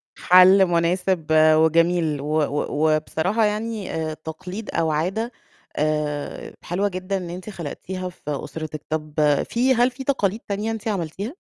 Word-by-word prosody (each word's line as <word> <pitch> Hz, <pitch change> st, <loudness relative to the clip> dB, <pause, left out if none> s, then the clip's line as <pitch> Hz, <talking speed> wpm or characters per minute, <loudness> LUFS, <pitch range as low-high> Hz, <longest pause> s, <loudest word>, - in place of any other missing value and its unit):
حَل 185 Hz, +2 st, +6 dB
مناسب 175 Hz, 0 st, 0 dB
وجميل 160 Hz, 0 st, +4 dB
و 145 Hz, -, -5 dB
و 150 Hz, +1 st, 0 dB
وبصراحة 180 Hz, +8 st, 0 dB
يعني 215 Hz, -1 st, -2 dB
آآ 160 Hz, -1 st, -2 dB
تقليد 180 Hz, +7 st, -8 dB
أو 160 Hz, -1 st, +1 dB
عادة 190 Hz, +10 st, -1 dB, 0.4 s
آآ 150 Hz, -1 st, -2 dB
حلوة 195 Hz, +4 st, -1 dB
جدًا 185 Hz, +1 st, -3 dB
إن 180 Hz, -2 st, -6 dB
أنتِ 180 Hz, +4 st, -7 dB
خلقتيها 185 Hz, +1 st, -6 dB
في 180 Hz, -, -19 dB
أسرتِك، 155 Hz, +1 st, -5 dB
طَب 155 Hz, -1 st, -3 dB, 0.4 s
في 255 Hz, +3 st, +2 dB
هل 245 Hz, +2 st, +3 dB
في 255 Hz, +2 st, -8 dB
تقاليد 220 Hz, -6 st, 0 dB
تانية 210 Hz, +2 st, -2 dB
أنتِ 225 Hz, 0 st, -5 dB
عملتيها؟ 195 Hz, -, -3 dB
180 Hz, 140 wpm, -23 LUFS, 155-205 Hz, 0.4 s, حَل